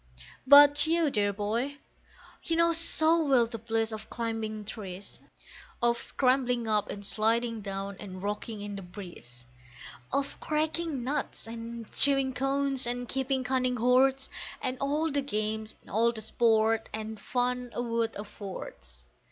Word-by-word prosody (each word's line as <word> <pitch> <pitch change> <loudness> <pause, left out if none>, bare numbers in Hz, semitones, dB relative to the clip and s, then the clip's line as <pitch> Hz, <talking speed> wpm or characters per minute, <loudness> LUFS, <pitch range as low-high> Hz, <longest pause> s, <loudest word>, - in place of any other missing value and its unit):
But 290 +2 +8
you, 330 -2 +2
dear 205 -3 +2
boy, 225 +8 -2 0.6
you 330 - -1
know 335 0 +3
so 330 0 +3
well 265 -5 +4
the 230 0 -6
bliss 225 0 -1
of 215 0 -7
climbing 225 -2 -4
trees, 200 -3 -8 0.6
Of 235 0 +2
scrambling 250 -3 +1
up 210 -1 +1
and 200 0 -5
sliding 225 +2 +1
down, 195 0 -5
and 185 -2 -8
rocking 210 +1 -4
in 205 0 -5
the 195 - -6
breeze, 175 - -10 0.6
Of 280 0 -2
cracking 310 -2 -1
nuts 280 +3 -2
and 230 0 -7
chewing 275 -2 +3
cones, 270 -1 +1
and 245 0 -2
keeping 265 0 0
cunning 255 -1 0
hoards, 260 +3 +3 0.3
And 255 - -2
all 300 +3 0
the 285 0 +1
games 215 -3 -3
and - - -16
all 230 +3 +3
the 225 -2 -4
sport 225 0 +2
and 220 0 -5
fun 250 0 -1
a 240 - -1
wood 230 -1 -1
affords. 185 - -9
235 Hz, 145 wpm, -29 LUFS, 215-270 Hz, 0.6 s, But